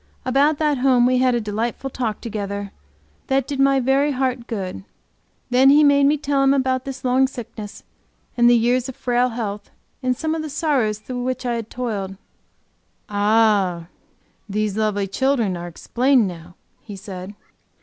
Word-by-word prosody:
About 280 +4 +3
that 295 -3 +1
home 250 -2 +4
we 250 0 +3
had 255 -1 +3
a - - +1
delightful 225 +5 -3
talk 230 -5 -3
together 200 -3 -5 0.6
that 270 -1 +1
did 280 -1 -5
my 275 0 +4
very 270 +3 +2
heart 255 -2 -2
good. 195 -5 -5 0.7
Then 260 +2 +5
he 295 +2 +6
made 280 -1 +5
me 300 +1 +3
tell 280 -1 0
him 275 +1 +4
about 260 -1 0
this 270 -1 -7
long 255 +1 +3
sickness 220 -5 -9 0.5
and 240 0 +5
the 240 - +6
years 245 +2 +1
of 260 - -8
frail 245 0 +1
health 210 -3 -5 0.3
and 255 -1 0
some 315 -1 -1
of 325 - -2
the 310 - -5
sorrows 275 -8 0
through 245 +4 -6
which 255 0 -3
I 240 - 0
had 230 -2 -4
toiled. 205 -6 -4 0.9
"Ah, 205 -5 +2 0.6
these 210 0 -1
lovely 210 -2 0
children 230 -1 0
are 175 0 -6
explained 245 +8 +1
now," 175 -1 -10 0.3
he 205 - -9
said. 190 0 -8
245 Hz, 170 wpm, -21 LUFS, 210-270 Hz, 0.9 s, he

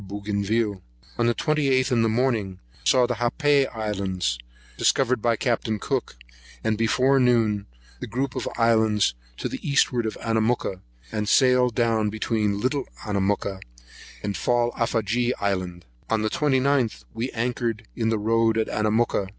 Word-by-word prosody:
Bougainville. 100 +1 -2 0.4
On 120 - +3
the 120 - +2
28th, 140 -4 +1
in 120 -2 +3
the 115 - +2
morning, 110 -5 0 0.3
saw 125 -1 +4
the - - -1
Happai 140 +3 +2
Islands, 95 - -2 0.4
discovered 130 -3 +2
by 115 0 +2
Capt. 115 -1 -1
Cook, 130 - -2 0.5
and 110 -1 +1
before 125 +5 +3
noon, 115 -5 +2 0.3
the 125 - -6
group 130 +4 -3
of - - -2
islands 110 -3 +3 0.2
to - - -3
the - - -5
eastward 125 -5 +1
of 110 - -5
Anamooka, 110 -4 0 0.3
and 105 -1 -2
sailed 125 -3 +4
down 115 -3 +2
between 105 -1 -1
Little 130 +4 -1 0.2
Anamooka 100 -1 -1 0.6
and 105 -1 -2
the - - -5
Fallafagee 120 0 +1
Island. 90 -3 -2 0.2
On 110 -1 +1
the 110 - 0
29th, 130 - +1
we 120 +3 -3
anchored 120 -2 -2
in 110 -2 0
the 110 - +1
road 115 +1 +2
of 110 - +1
Anamooka. 105 -2 0
115 Hz, 145 wpm, -24 LUFS, 105-125 Hz, 0.6 s, saw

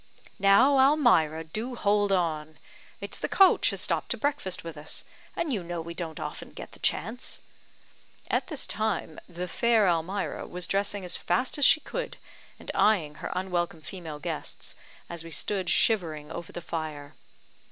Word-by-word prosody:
"Now, 235 +8 +6
Almira, 240 - +4
do 220 +10 -5
hold 205 -2 +2
on. 155 -4 0 0.4
It's - - -3
the - - -2
coach 385 -1 +6
has - - -2
stopped - - 0
to - - 0
breakfast 285 -10 -1
with 165 -1 -7
us; 150 +1 -5 0.3
and 310 -5 -1
you 205 - 0
know 175 0 -4
we 170 +1 -6
don't 165 -3 -5
often - - -6
get - - -9
the - - -15
chance." 225 +8 -1 0.9
All - - +3
this 305 -5 -3
time 215 -7 -2
the 180 +1 -5
fair 225 +2 +3
Almira 180 +3 -1
was 180 -1 -3
dressing 200 +1 0
as 180 - -1
fast 220 +11 0
as 285 - +5
she 310 - +6
could, - - -5 0.4
and - - -6
eyeing 175 -9 +3
her - - -4
unwelcome 175 -3 -1
female 165 -5 -7
guests, 150 - -5 0.3
as 170 -1 -6
we 165 - -9
stood 185 +2 -1
shivering 160 -9 +2
over 170 -1 -6
the 175 - -6
fire. 155 -4 -5
180 Hz, 165 wpm, -28 LUFS, 165-220 Hz, 0.9 s, Now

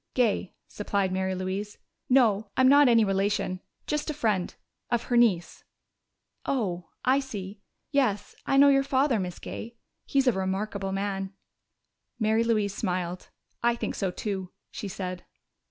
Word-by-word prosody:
"Gay," 225 -6 +1
supplied 200 -2 -1
Mary 190 0 -1
Louise. 190 +3 -4 0.3
"No, 220 -5 +4
I'm 260 0 +6
not 285 +1 +7
any 230 -2 +5
relation. 195 -1 0 0.3
Just 300 +1 -2
a 305 - -2
friend 210 -10 0 0.3
of 240 -1 +1
her 245 - -1
niece." 215 -8 +2 0.8
"Oh, 180 -10 -2 0.2
I 260 +2 +4
see.... 205 -7 -7 0.3
Yes, 250 -8 +1
I 275 - +3
know 280 +1 +8
your 275 -1 +5
father, 270 -3 +2
Miss 180 -2 -4
Gay. 235 +1 -8 0.3
He - - -2
is 270 - +5
a 250 - +5
remarkable 195 0 -2
man." 195 0 -2 0.8
Mary 220 0 +2
Louise 215 -4 +1
smiled. 180 -3 -3 0.3
"I 235 0 +3
think - - -3
so 195 - -1
too," 190 0 -4 0.2
she 205 - -5
said. 185 -1 -5
210 Hz, 150 wpm, -27 LUFS, 190-245 Hz, 0.8 s, know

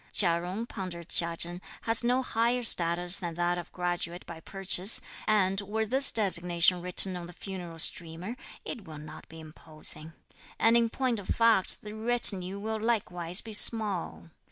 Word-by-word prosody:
"Chia 170 -3 +5
Jung," 185 +6 -5
pondered 185 -7 -8
Chia 170 -1 +2
Chen, 175 +2 -4 0.2
"has 225 +1 +2
no 250 +2 +1
higher 240 +1 0
status 175 -3 +2
than 170 -3 -6
that 175 +1 -1
of 175 - -10
graduate 175 -1 -4
by 165 -1 -10
purchase, 195 +3 +1 0.3
and 195 -2 +2
were 215 +2 -3
this 265 +5 +1
designation 180 -3 +2
written 180 +1 +4
on 175 -1 -7
the 175 - -12
funeral 180 -3 -8
streamer, 170 +5 -1 0.3
it 215 - -7
will 155 -3 -10
not 150 +1 -12
be 160 - -12
imposing, 155 0 -4 0.4
and, 225 +1 +3
in 235 -1 +3
point 250 -2 -2
of 195 - -11
fact, 230 -5 +1
the 210 0 -8
retinue 215 -4 +3
will 220 +1 -4
likewise 180 -6 -1
be 220 - -10
small." 205 -6 +1
185 Hz, 165 wpm, -28 LUFS, 170-220 Hz, 0.4 s, Chia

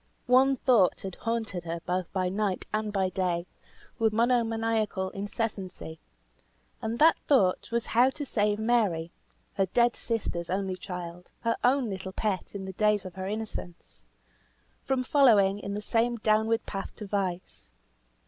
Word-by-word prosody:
One 260 +2 +5
thought 240 -7 +3
had 190 -1 -5
haunted 225 -6 -3
her 165 0 -3
both 180 -1 -2
by 185 -1 0
night 195 0 -1
and 215 0 -1
by 190 -2 +1
day, 180 -2 -1 0.5
with 225 -1 +3
monomaniacal 225 -4 +1
incessancy; 195 -5 -4 0.8
and 225 +1 -2
that 320 +4 +6
thought 195 -11 +3
was 235 0 -1
how 245 +3 +4
to 290 +2 -5
save 210 -4 +1
Mary 210 -8 +1 0.4
(her 195 -1 +1
dead 240 +5 +3
sister's 195 -7 -3
only 190 0 -1
child, 180 -1 -7
her 230 0 +1
own 255 0 +3
little 190 -2 -5
pet 205 -1 -2
in 195 -1 -5
the 190 - -6
days 210 0 +2
of 185 - -7
her 190 +1 -5
innocence) 210 - -6 0.8
from 265 -1 0
following 215 -8 +4
in 200 0 -5
the 210 - -3
same 235 +2 +1
downward 220 +1 +2
path 195 -1 -6
to 215 - -7
vice. 190 -3 -3
210 Hz, 150 wpm, -28 LUFS, 185-230 Hz, 0.8 s, that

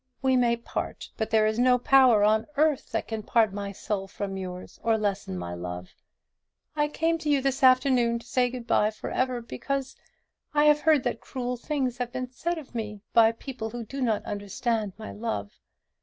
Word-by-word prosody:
We 260 -1 +3
may 240 -2 +3
part; 235 - -5
but 220 - -2
there 220 -1 +4
is 215 +2 0
no 250 0 +5
power 250 -4 +5
on 215 +1 +3
earth 305 -2 +2
that - - -2
can 220 -1 -3
part 220 -1 +2
my 200 0 -4
soul 195 0 -3
from 195 0 -5
yours, 185 -1 -7
or 225 -1 +2
lessen 200 - -2
my 85 0 -5
love. 90 +1 -6 0.8
I 295 -1 +2
came 325 +2 0
to 305 - -3
you 285 -1 +4
this 270 0 -1
afternoon 255 -2 +4
to 230 - -11
say 250 0 +1
good 245 -1 -7
bye 210 -2 +3
for 215 - -7
ever, 255 -1 0
because 265 - -4 0.6
I 295 0 +5
have 300 0 +6
heard 305 -4 +4
that - - -2
cruel 250 -1 -4
things 255 -1 -2
have 245 -1 -2
been 255 0 -4
said 340 +6 -2
of 300 -6 -10
me 210 -3 -5
by 225 -1 +6
people 230 -1 -6
who 235 0 -6
do 275 +5 -6
not 225 -4 0
understand 205 +1 -2
my 220 - -7
love. 205 - -4
235 Hz, 200 wpm, -27 LUFS, 210-260 Hz, 0.8 s, have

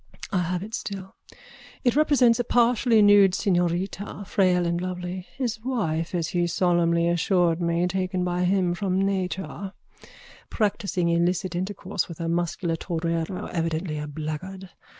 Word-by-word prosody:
I 190 - +1
have 180 +1 -1
it 220 +2 -9
still. 195 -3 -6 0.7
It 245 -1 +2
represents 260 -6 +4
a - - +2
partially 235 -1 +3
nude 205 -2 +6
señorita, 185 +3 -1
frail 180 -2 +2
and 170 0 -1
lovely 180 0 -5
(his 245 -4 -2
wife, 180 -9 -1
as 165 -3 -1
he 175 -1 0
solemnly 170 -1 +2
assured 175 0 +2
me, 170 +1 +1
taken 185 0 -1
by 180 0 0
him 185 -1 +2
from 185 +1 -1
nature), 195 0 -2 0.8
practising 200 -5 0
illicit 175 +1 +1
intercourse 190 0 -3
with 170 - -9
a 165 - -2
muscular 170 0 -1
torero, 165 +1 -2
evidently 165 -2 -2
a 150 - -5
blackguard. 160 +6 -6
180 Hz, 140 wpm, -25 LUFS, 170-195 Hz, 0.8 s, nude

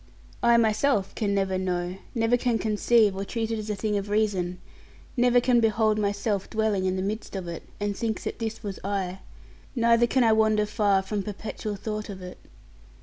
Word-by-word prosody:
I 235 0 +5
myself 220 -1 +2
can 200 -2 -1
never 190 -1 0
know; 180 0 -2 0.2
never 225 +1 +3
can 245 -1 +1
conceive, 215 -1 +3
or 195 - -3
treat 225 +2 -3
it 225 - -1
as 215 0 -6
a 210 - -1
thing 210 +1 -1
of 200 +1 -7
reason, 195 -4 0 0.6
never 245 -1 +4
can 245 0 +3
behold 220 -1 +2
myself 205 -1 -1
dwelling 215 -3 0
in 185 0 +1
the 185 - -2
midst 210 +1 -4
of 185 -2 -4
it, 170 -1 -5 0.2
and 205 -1 -1
think 220 +1 -2
that - - -4
this 225 0 -4
was 200 -2 -5
I; 190 -2 -2 0.6
neither 235 0 +4
can 260 +1 +2
I 225 - +5
wander 215 -1 +3
far 205 -2 +2
from 205 +1 -2
perpetual 210 +1 -5
thought 215 +1 -5
of 195 -2 -7
it. 180 0 -9
210 Hz, 195 wpm, -26 LUFS, 195-225 Hz, 0.6 s, I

